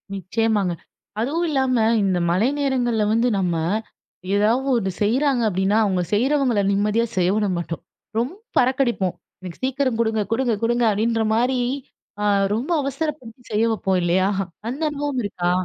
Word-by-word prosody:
நிச்சயமாங்க. 200 0 0 0.5
அதுவும் 315 +9 0
இல்லாம 265 -3 +1 0.3
இந்த 190 -2 +1
மழை 195 +9 +2
நேரங்கள்ல 245 -5 +1
வந்து 230 +2 +2
நம்ம 175 -3 0 0.8
ஏதாவது 230 +6 +2
ஒண்ணு 190 -4 -1
செய்றாங்க 260 +4 +2
அப்டின்னா, 190 +3 +1
அவங்க 190 -3 +1
செய்றவங்களை 250 -1 +2
நிம்மதியா 210 +3 +1
செய்ய 180 0 +3
விட 215 -1 +1
மாட்டோம். 170 -1 -5 0.4
ரொம்ப 255 +9 -2 0.2
பறக்கடிப்போம் 245 -7 +1 0.3
எனக்கு 180 -2 -9
சீக்கிரம் 260 -2 0
குடுங்க 220 -1 +1
குடுங்க 245 0 +1
குடுங்க 240 +1 +2
அப்படின்ற 225 +2 0
மாரி 250 +3 +1 0.9
ரொம்ப 235 +8 -2
ஆ - - +1
அவசரப்படுத்தி 275 -4 -4
செய்ய 215 +2 +2
வைப்போம் 190 -4 0
இல்லையா? 180 +2 +2 0.4
அந்த 270 +6 -4
அனுபவம் 290 -2 -3
இருக்கா? 175 -3 -1
230 Hz, 140 wpm, -22 LUFS, 200-260 Hz, 0.9 s, செய்ய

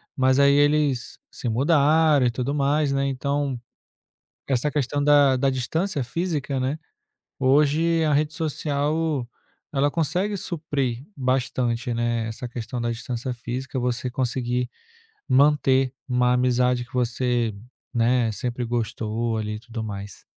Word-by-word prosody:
mas 130 0 +3
aí 140 0 +6
eles 145 -3 +2
se - - -6
mudaram 150 +2 +4
e - - +1
tudo 130 +3 -2
mais, 145 0 +1
né, 140 0 +1
então, 140 -1 -1 0.9
essa 135 +2 +1
questão 145 0 -1
da 145 -2 +5
da 135 +1 +2
distância 140 - -1
física, 145 -2 -2
né, 135 +4 -1 0.6
hoje 150 +5 +3
a 150 -2 +2
rede 150 +2 +1
social 150 -3 -1 0.4
ela 145 0 +2
consegue 180 +7 0
suprir 145 -8 -3
bastante, 125 -2 -1
né, 115 -1 -1
essa 110 +3 -5
questão 120 0 -5
da 120 0 -1
distância 120 +1 -4
física, 125 +3 -5
você 125 0 -1
conseguir 125 0 -1 0.6
manter 135 -2 +4 0.2
uma 125 0 +2
amizade 125 0 +2
que 120 - -23
você, 120 -2 0 0.4
né, 120 0 +2
sempre 120 +3 -3
gostou, 115 -1 -2
ali, 105 -1 -3
e - - -9
tudo 115 -1 -6
mais. 100 -2 -7
130 Hz, 135 wpm, -24 LUFS, 120-145 Hz, 0.9 s, aí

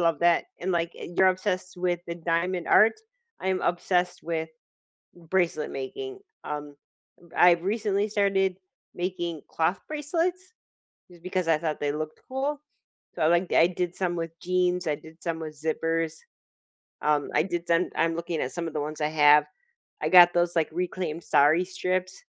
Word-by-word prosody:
love 165 -3 +2
that, 170 -1 +4 0.2
and, 185 +2 -2
like, 170 -1 0
you're 180 +2 +1
obsessed 185 -1 -2
with 175 -1 0
the 170 - -4
diamond 170 +1 -1
art, 215 +3 +6 0.5
I 190 - -2
am 185 -1 +1
obsessed 180 0 0
with 160 -1 -3 0.7
bracelet 170 -2 -1
making. 390 - -6 0.2
Um, 145 -1 -6 0.5
uh, - - -17
I've 175 -1 +5
recently 205 0 0
started 195 -2 +1 0.4
making 175 -3 -3
cloth 165 +4 0
bracelets, 345 +5 -2 0.6
just 175 -1 -17
because 185 -2 -2
I 160 -2 +4
thought 155 -1 -3
they 145 -1 0
looked 155 0 -5
cool. 275 +3 -2 0.6
So, 170 - -5
I - - +5
like 175 +2 +2
I 165 - +6
did 180 0 -3
some 180 -2 -1
with 165 -1 -3
jeans, 180 -1 0
I 150 - +1
did 160 +2 -16
some 165 -2 -3
with 155 -2 -8
zippers. 165 0 -1 0.9
Um, 150 -1 +1
I 150 - +3
did 175 -2 -3
some 170 +1 +2
I'm 165 0 +1
looking 170 -1 -3
at 130 - -2
some 170 -1 -4
of - - -7
the 150 - -2
ones 155 +1 -5
I 150 - +2
have. 150 -1 +5 0.6
I - - 0
got 175 -1 +8
those, 175 0 +1
like, 160 -2 +2
reclaimed 175 -1 -3
sari 155 +6 +4
strips, 185 - -3
175 Hz, 170 wpm, -26 LUFS, 160-185 Hz, 0.9 s, got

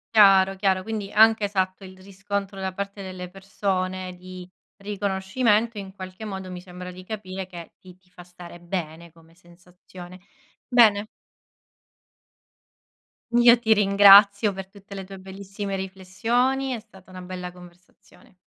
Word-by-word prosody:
Chiaro, 195 -2 +6
chiaro. 190 -1 +1
Quindi 210 -1 -5
anche, 220 0 +5
esatto, 190 -1 -2
il 185 0 -12
riscontro 195 +1 -5
da 190 0 -3
parte 200 +1 -6
delle 185 -1 -8
persone 185 -1 -3
di 180 0 -11 0.3
riconoscimento, 205 +3 -1
in 195 -1 -8
qualche 185 +2 -9
modo, 190 -3 -6
mi 180 -1 -7
sembra 180 0 -9
di 185 +1 -12
capire 190 -2 -6
che 170 -2 -11
ti 185 -1 -16
ti 185 -1 -34
fa 180 -1 -13
stare 175 -1 -13
bene 170 -2 -6
come 165 0 -22
sensazione. 180 +1 -15 0.5
Bene. 215 -4 +4 2.2
Io 240 0 +6
ti 225 -2 +3
ringrazio 200 0 +6
per 190 0 -7
tutte 200 0 -14
le 195 -1 -7
tue 195 +1 -10
bellissime 195 +1 -7
riflessioni. 230 +8 -1
È 235 - -4
stata 195 -4 -19
una 185 0 -10
bella 180 0 -7
conversazione. 180 0 -19
190 Hz, 140 wpm, -24 LUFS, 185-205 Hz, 2.2 s, Chiaro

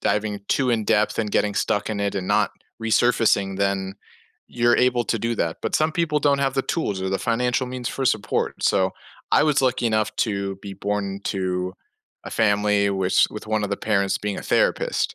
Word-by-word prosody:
diving 105 0 -1
too 130 -3 +2
in-depth 110 -1 +1
and 105 -2 -1
getting 105 0 +1
stuck 105 +1 0
in 100 - -3
it 100 0 -1
and 95 -2 -3
not - - +2 0.3
resurfacing, 110 -4 +2
then 100 -1 -1 0.5
you're 120 0 +2
able 125 -1 +2
to 115 - -1
do 115 +2 -1
that. 80 -6 -2
But - - -2
some 155 +1 +2
people 160 -3 +1
don't 140 -1 +3
have 135 -1 0
the 135 - +1
tools 105 - -2
or 95 - -1
the 95 - 0
financial 125 +1 0
means 125 -1 -4
for 135 - -3
support. 110 -4 -1
So, 95 0 +2 0.4
I - - +5
was 150 -3 +2
lucky 125 -2 +1
enough 110 -1 0
to 100 -3 -1
be 100 -1 -7
born 100 0 -3
to 90 -1 -2 0.5
a - - -7
family 105 -1 +2
wis 95 -1 +2
with 105 0 -8
one 110 -1 0
of 100 - -4
the 100 - -1
parents 100 -3 0
being 105 -1 -3
a - - -6
therapist. - - +1
105 Hz, 200 wpm, -23 LUFS, 100-120 Hz, 0.5 s, I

